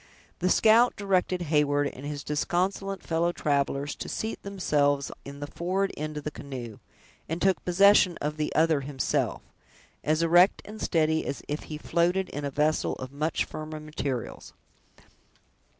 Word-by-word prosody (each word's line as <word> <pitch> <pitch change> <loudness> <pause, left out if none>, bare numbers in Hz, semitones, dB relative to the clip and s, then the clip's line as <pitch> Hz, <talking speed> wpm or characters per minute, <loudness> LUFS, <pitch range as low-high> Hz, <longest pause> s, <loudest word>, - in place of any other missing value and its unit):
The 180 - +1
scout 225 +5 +5
directed 185 -2 0
Heyward 145 -2 +2
and 130 - -11
his 145 -1 -5
disconsolate 185 +5 -1
fellow 170 +1 +1
travelers 140 -2 0
to - - -6
seat 220 +1 -4
themselves 145 -8 0
in 140 +1 -9
the - - -2
forward 185 +6 -1
end 155 0 -5
of 150 - -5
the 150 - -3
canoe, 125 -8 -8 0.5
and 165 +2 -2
took 190 +1 +2
possession 185 -1 +5
of 150 +1 -3
the 150 -1 -1
other 160 -2 +3
himself, 135 -1 -1 0.6
as 155 +2 +1
erect 175 +3 +5
and 215 +1 -9
steady 160 -1 +2
as 140 - -4
if 150 +1 -4
he 155 - -6
floated 175 +4 +1
in 145 - -5
a 140 - -1
vessel 150 +3 +1
of 130 0 -7
much 150 +3 -1
firmer 155 0 -7
materials. 145 -5 -5
155 Hz, 155 wpm, -27 LUFS, 145-180 Hz, 0.6 s, scout